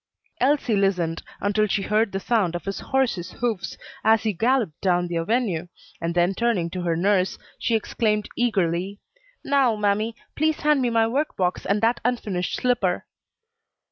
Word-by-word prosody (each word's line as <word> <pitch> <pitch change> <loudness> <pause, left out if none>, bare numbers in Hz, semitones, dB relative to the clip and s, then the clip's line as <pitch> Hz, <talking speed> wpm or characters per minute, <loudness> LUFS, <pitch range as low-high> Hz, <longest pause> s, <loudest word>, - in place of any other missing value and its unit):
Elsie 270 -4 +2
listened 180 -5 +1 0.2
until 205 +1 +2
she 200 -1 0
heard 210 +1 +1
the 195 - -2
sound 195 -5 +1
of 175 - -5
his 195 0 -3
horse's 235 -10 -1
hoofs 225 -6 -2 0.3
as 220 0 +4
he 215 -2 0
galloped 230 - 0
down 180 -2 +2
the 175 -1 -2
avenue, 180 -2 0 0.3
and 170 +1 -2
then 175 +2 +3
turning 195 -6 0
to 185 - -4
her 170 -2 0
nurse, 185 +1 +1 0.2
she 230 - +1
exclaimed 215 -1 0
eagerly, 195 -4 0 0.5
"Now, 275 -5 +3
mammy, 210 +2 0 0.2
please 310 +1 +1
hand 300 -2 +3
me 245 - +2
my 225 -1 +3
work 280 +7 -1
box 180 -1 -1
and 200 +1 +1
that 230 +2 +2
unfinished 210 -7 -1
slipper." 220 -8 0
205 Hz, 165 wpm, -24 LUFS, 180-235 Hz, 0.5 s, as